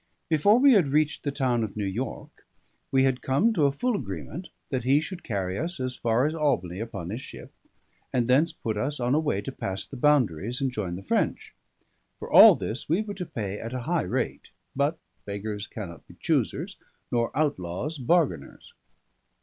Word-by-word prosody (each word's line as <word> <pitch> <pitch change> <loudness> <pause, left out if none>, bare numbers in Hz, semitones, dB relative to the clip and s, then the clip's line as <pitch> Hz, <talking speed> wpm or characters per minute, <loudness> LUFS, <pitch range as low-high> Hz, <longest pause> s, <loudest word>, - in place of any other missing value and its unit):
Before 185 +8 +5
we 270 +1 +6
had 190 -9 +4
reached 150 +2 +1
the 145 - -2
town 125 -4 0
of 105 -1 -5
New 105 - -1
York 110 +6 -5 0.4
we 135 -1 +3
had 130 -1 +1
come 165 +13 +2
to 150 -8 +3
a - - +1
full 240 - -1
agreement, 85 - -5 0.2
that 130 -2 -2
he 135 +4 +4
should 175 +3 -6
carry 95 -4 -2
us 170 +2 -3
as 130 -1 -2
far 120 +2 +1
as 155 - 0
Albany 120 - 0
upon 105 -6 -5
his 115 +4 -4
ship, - - -11 0.6
and 120 -2 +1
thence 145 +7 +4
put 110 -9 -4
us 140 +6 -1
on 125 +1 +1
a 150 - +4
way 145 -11 0
to - - -5
pass 95 0 -4
the - - -10
boundaries 120 - +2
and 135 -1 0
join 95 -7 -3
the 95 - -8
French. - - -1 0.6
For - - -8
all - - +10
this 115 +6 -5
we 175 +7 +2
were 205 -1 -6
to 180 -3 -6
pay 105 -3 -4
at 115 +3 -5
a 125 - -3
high 170 +1 +1
rate; - - -3 0.3
but 145 +4 +1 0.3
beggars 105 0 -4
cannot 85 -8 -8
be - - -15
choosers, - - -1 0.3
nor 120 -1 +1
outlaws 140 - -1
bargainers. 165 +4 0
130 Hz, 190 wpm, -26 LUFS, 105-150 Hz, 0.6 s, all